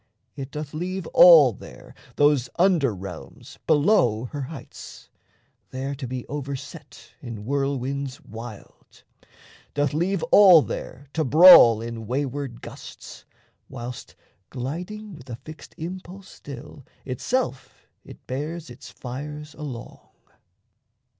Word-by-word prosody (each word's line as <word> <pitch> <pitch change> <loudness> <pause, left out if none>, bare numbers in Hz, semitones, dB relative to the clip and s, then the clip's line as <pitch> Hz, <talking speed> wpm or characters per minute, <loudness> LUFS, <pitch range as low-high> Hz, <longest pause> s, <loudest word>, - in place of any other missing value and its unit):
It 140 -2 -6
doth 150 0 -7
leave 180 +3 -4
All 155 -9 +8
there - - -13 0.2
those 145 -4 +3
under 170 -8 +3
realms 95 -3 -10
below 145 - +3
her 145 - -5
heights 135 +2 -10 0.6
There 135 +2 -4
to 135 -2 -6
be 125 0 -5
overset 140 -2 -8
in 110 -3 -8
whirlwinds 140 0 -2
wild, 110 -1 -12 0.7
Doth 145 -1 0
leave 175 +4 0
all 185 -7 +8
there 140 +3 -7
to 160 - 0
brawl 140 -6 +8
in 115 -2 -7
wayward 135 -1 -3
gusts, - - -11 0.4
Whilst, 125 -2 -8 0.3
gliding 180 - -6
with 135 -5 -13
a 120 - -5
fixed 155 +6 -13
impulse 185 +3 -8
still, 140 +1 -11 0.2
Itself 135 - -3 0.2
it - - -14
bears 150 +3 -5
its 120 - -12
fires 150 +4 -8
along. 130 -6 -8
140 Hz, 115 wpm, -24 LUFS, 125-160 Hz, 0.7 s, All